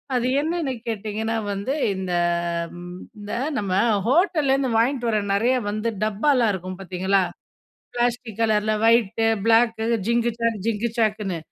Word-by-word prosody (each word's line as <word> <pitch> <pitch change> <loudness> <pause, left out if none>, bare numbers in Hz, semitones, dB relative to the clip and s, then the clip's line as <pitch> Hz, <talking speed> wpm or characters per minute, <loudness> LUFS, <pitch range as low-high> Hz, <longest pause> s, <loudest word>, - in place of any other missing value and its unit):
அது 245 0 +1
என்னன்னு 320 -3 -1
கேட்டிங்கன்னா 220 +1 -2
வந்து 200 +6 -3 0.2
இந்த, 190 -1 -4 1.1
இந்த 205 0 -8 0.3
நம்ம 200 -3 -2 0.4
ஹோட்டல்லேருந்து 275 -3 +2
வாங்கிட்டு 240 +1 +1
வர 215 -2 +2
நிறைய 235 +6 +2
வந்து 215 +2 -1
டப்பாலாம் 225 +2 +2
இருக்கும் 185 0 -6
பார்த்தீங்களா? 190 +1 +1 0.7
பிளாஸ்டிக் 240 -2 -1
கலரில, 215 -1 +2
ஒயிட், 225 -1 +3 0.2
பிளாக்கு 225 0 +3 0.2
"ஜிங்கு 235 +1 +2
ஜாக், 230 -1 0
ஜிங்கு 230 +1 0
ஜக்குன்னு" 210 -5 0
225 Hz, 120 wpm, -23 LUFS, 210-240 Hz, 1.1 s, ஒயிட்